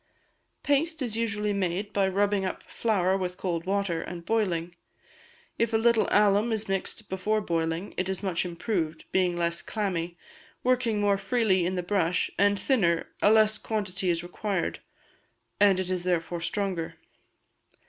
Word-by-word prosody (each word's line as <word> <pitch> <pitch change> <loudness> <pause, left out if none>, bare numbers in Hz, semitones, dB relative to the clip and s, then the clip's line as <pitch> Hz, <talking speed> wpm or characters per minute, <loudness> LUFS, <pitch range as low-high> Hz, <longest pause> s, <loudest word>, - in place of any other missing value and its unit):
Paste 305 +1 +1
is 230 -4 -1
usually 210 -2 0
made 195 +1 -2
by 195 -1 +2
rubbing 200 +1 +1
up 185 - -4
flour 190 -5 +1
with 180 -1 -3
cold 175 -2 -3
water, 195 -4 0
and 170 -1 -7
boiling; 175 -6 0 0.9
if 230 0 +1
a - - +5
little 230 0 +3
alum 210 +2 +4
is 220 -1 -1
mixed 195 +2 -2
before 200 +3 0
boiling 165 -1 -2
it 185 +1 -1
is 190 +1 -2
much 185 -3 0
improved, 170 -2 -3
being 180 -2 +2
less 170 0 -1
clammy, 175 -5 -3 0.5
working 245 -4 +2
more 200 -1 +2
freely 195 -4 +2
in 185 - -2
the 180 - -2
brush, 180 -2 +1
and 200 0 +3
thinner, 185 -8 +1
a - - +5
less 215 -1 +4
quantity 195 -4 -1
is 170 -1 0
required, 185 +1 -2 0.8
and 200 -2 +5
it 185 0 -2
is 180 -1 -1
therefore 175 -1 -1
stronger. 185 -3 -2
195 Hz, 155 wpm, -27 LUFS, 175-210 Hz, 0.9 s, a